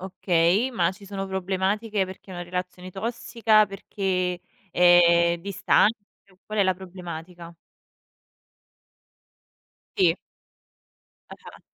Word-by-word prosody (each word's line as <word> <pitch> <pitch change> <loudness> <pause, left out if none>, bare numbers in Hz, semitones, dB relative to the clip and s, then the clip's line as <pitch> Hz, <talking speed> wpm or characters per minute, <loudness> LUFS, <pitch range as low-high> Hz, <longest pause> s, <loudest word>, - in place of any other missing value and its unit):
Okay, 185 +4 +1
ma 180 -6 0
ci 200 +1 -15
sono 195 0 -5
problematiche 190 +2 -1
perché 190 +1 -12
è - - -7
una 175 0 -6
relazione 180 +1 -6
tossica, 220 0 +1
perché 185 -3 -3 0.3
è 170 -1 +5
distante, 200 +3 +2 0.5
qual 215 0 -4
è - - +6
la 185 -1 +2
problematica? 175 -2 -9 2.4
Sì. 175 -3 +3 1.2
Ah-ah. - - -13
185 Hz, 95 wpm, -25 LUFS, 175-200 Hz, 2.4 s, è